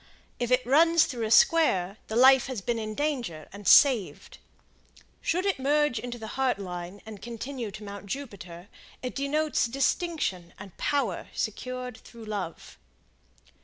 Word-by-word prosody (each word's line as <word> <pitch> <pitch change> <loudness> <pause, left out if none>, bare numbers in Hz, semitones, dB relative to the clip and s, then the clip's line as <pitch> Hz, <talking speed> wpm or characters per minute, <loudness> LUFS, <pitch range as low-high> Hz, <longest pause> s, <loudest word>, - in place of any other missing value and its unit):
If 240 -1 -1
it 250 -1 +2
runs 330 +5 +5
through 235 -4 -4
a - - -5
square, 215 - +4
the 220 - -5
life 260 +1 +6
has 260 -4 -4
been 235 +4 -1
in 215 -1 -5
danger 245 - -3
and 200 0 -8
saved. 255 -10 +4 0.8
Should 360 +3 0
it 395 -7 0
merge 290 -2 +2
into 245 -1 -6
the 225 - -8 0.2
Heart 260 -4 +2
Line 180 0 -7
and 215 -2 -10
continue 240 0 -5
to 215 +2 -10
Mount 200 -1 -8
Jupiter, 190 -8 -7 0.4
it 250 - -4
denotes 295 0 0
distinction 270 - -1
and 195 -2 -11
power 265 -11 -1
secured 250 +2 -4
through 230 -2 -13
love. 200 -6 -6
240 Hz, 150 wpm, -27 LUFS, 200-275 Hz, 0.8 s, life